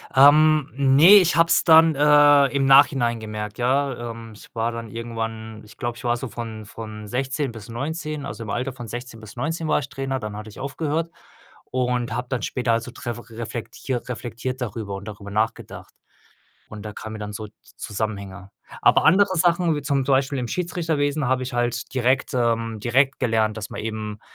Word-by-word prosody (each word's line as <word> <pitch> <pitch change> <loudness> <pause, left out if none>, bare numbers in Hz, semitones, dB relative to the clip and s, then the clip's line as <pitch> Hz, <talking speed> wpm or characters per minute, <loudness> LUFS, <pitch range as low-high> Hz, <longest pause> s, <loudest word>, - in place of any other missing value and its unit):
Ähm, 150 +2 +6
ne, 140 +8 +7
ich 180 -2 +2
habe 165 - +5
es - - +3
dann, 160 -1 +6
äh, 145 -1 +6
im 135 0 0
Nachhinein 135 -4 +5
gemerkt, 105 -1 -6
ja. 125 -1 0
Ähm, 115 -1 -10
ich - - -16
war 115 0 -1
dann 115 -1 -6
irgendwann 115 -1 -6
ich 105 +2 -17
glaube, 120 -2 -3
ich - - -12
war 120 -1 +1
so 130 - -5
von 110 -1 -7
von 105 0 -9
16 130 +4 -2
bis 110 -1 -11
19, 150 +4 -4
also, 115 -4 -6
im 110 - -8
Alter 125 +4 -2
von 120 -3 -9
16 120 0 -7
bis 110 -2 -12
19 160 +4 -2
war - - +3
ich 140 - -6
Trainer, 135 -1 -3
dann 105 -2 -6
hatte 105 +1 -8
ich - - -13
aufgehört 155 +4 -2 0.6
und 125 -1 -1
habe 125 +1 -3
dann 130 -3 -2
später 125 -2 -1
also 115 +2 -2
dref 120 0 -5
reflektiert 115 +2 -5
reflektiert 125 +1 -5
darüber 105 -4 -4
und 100 +2 -9
darüber 100 -1 -8
nachgedacht. 110 +2 -3 0.8
Und 105 -1 -8
da 105 - -6
kamen 110 +1 -8
mir 110 - -7
dann 105 0 -6
so 105 +1 -6 0.3
Zusammenhänge. 100 -2 -5 0.3
Aber - - +4
andere 185 +2 +4
Sachen, 170 -1 +2
wie 145 - -4
zum 140 -1 0
zum 140 - +2
Beispiel 135 +1 0
im 125 - -2
Schiedsrichterwesen 155 -4 -1
habe 130 0 +1
ich 130 - -5
halt 120 0 -2
direkt 130 0 +1
ähm, 115 -2 0
direkt 130 +3 +2
gelernt, 110 -3 +1
dass 105 -1 -6
man - - -6
eben, 110 -1 -5
120 Hz, 190 wpm, -23 LUFS, 110-140 Hz, 0.8 s, ne